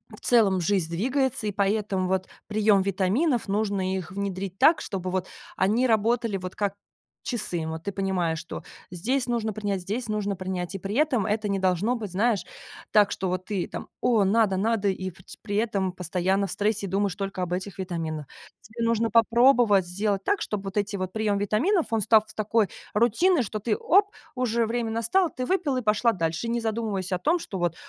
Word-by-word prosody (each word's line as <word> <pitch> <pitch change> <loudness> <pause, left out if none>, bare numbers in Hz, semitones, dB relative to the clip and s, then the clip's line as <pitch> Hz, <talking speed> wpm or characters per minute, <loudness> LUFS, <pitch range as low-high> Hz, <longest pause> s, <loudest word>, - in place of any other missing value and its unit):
в - - -17
целом, 205 -6 +3
жизнь 180 -2 +1
двигается, 250 +5 0
и - - 0
поэтому, 200 -1 0
вот, 190 0 0 0.2
прием 210 -2 +3
витаминов, 205 - +1
нужно 200 -2 0
их 185 -2 -5
внедрить 195 -1 -4
так, 320 +1 +6
чтобы, 185 -2 -4
вот, 185 0 -1 0.3
они 220 +7 +2
работали, 225 -1 +1
вот, 185 0 -7
как 200 -2 -1 0.5
часы. 180 -9 -2
Вот, 160 0 -5
ты 200 - -4
понимаешь, 185 -4 0
что 170 - -7 0.3
здесь 245 +9 -1
нужно 230 -3 -1
принять, 205 -2 -2
здесь 215 +6 -4
нужно 205 -2 -1
принять, 185 0 -4
и - - -1
при 195 +3 -5
этом 270 -7 +2
это 215 0 -1
не 200 -1 0
должно 190 +5 +1
быть, 215 -5 -5
знаешь, 210 +2 +1 0.5
так, 210 -2 +5
что, 190 - -2
вот 185 0 -3
ты 200 -4 -2
там, - - -6
о, 225 -5 +3
надо, 200 -1 +3
надо, 210 0 +1
и 185 0 -3
вот 185 - -13
при 205 - -4
этом 200 -4 0
постоянно 185 +3 0
в - - -7
стрессе, 210 0 0
думаешь 195 0 0
только 195 -1 -4
об 180 -1 -2
этих 190 +2 -4
витаминах. 165 -5 -3 0.4
Тебе 230 +2 -4
нужно 230 0 +1
попробовать 230 -3 +5
сделать 200 +2 -1
так, 405 - +1
чтобы 205 -2 -3
вот 195 - -6
эти 205 0 -1
вот 185 -1 -4
прием 215 -2 0
витаминов, 260 - +1
он 225 -1 +1
став 215 0 +5
такой 215 0 +1 0.3
рутиной, 245 - +3
что 215 0 -4
ты: 220 +1 0
"Оп, 395 +4 +4 0.3
уже 235 -2 +1
время 230 0 -2
настало!". 230 - +2
Ты 255 -3 -4
выпила, 290 -7 0
пошла 220 +1 +3
дальше, 165 +3 -2
не 235 +1 0
задумываясь 215 -4 -2
о 180 - 0
том, 325 - +2
что, 200 - -6
вот, 175 -2 0
205 Hz, 190 wpm, -26 LUFS, 190-230 Hz, 0.5 s, так